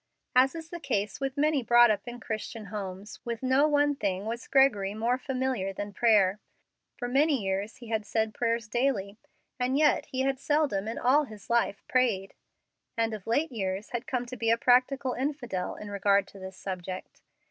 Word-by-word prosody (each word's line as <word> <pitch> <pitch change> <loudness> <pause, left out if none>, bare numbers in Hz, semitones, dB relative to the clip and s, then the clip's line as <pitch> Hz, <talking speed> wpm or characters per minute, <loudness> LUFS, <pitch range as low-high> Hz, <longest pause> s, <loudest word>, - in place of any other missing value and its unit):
As 260 +4 +5
is 325 -1 -7
the 345 - -5
case 205 -9 -2
with 270 0 -3
many 300 -1 +2
brought 240 -1 +6
up 205 +2 -2
in 240 0 -6
Christian 220 0 -5
homes, 200 0 -6
with 235 0 -5
no 260 +3 +4
one 290 -1 +3
thing 200 -5 -2
was 235 +2 -4
Gregory 210 -8 +3
more 235 +4 0
familiar 255 -7 -2
than 205 +1 -6
prayer. 210 -3 +3 0.6
For 245 - -3
many 280 +3 +3
years 195 +2 -2
he 240 -2 -12
had 220 -2 0
said 220 +1 -1
prayers 230 -1 -1
daily, 215 -4 -1 0.4
and 255 +2 +1
yet 305 0 +3
he 260 - -2
had 270 0 0
seldom 285 -9 +1
in 225 - -4
all 285 +5 +3
his 215 -1 -11
life 235 -4 +1
prayed, 225 -7 +1 0.6
and 225 -1 +1
of 210 -2 -7
late 290 +7 +1
years 195 -3 -3
had 240 +2 -4
come 250 -4 -1
to 250 +1 -7
be 230 -2 -1
a 230 - +4
practical 255 +2 +3
infidel 250 -9 -3
in 210 -1 -8
regard 200 0 +2
to 200 - -13
this 190 0 -9
subject. 185 -1 -6
235 Hz, 190 wpm, -28 LUFS, 205-265 Hz, 0.6 s, brought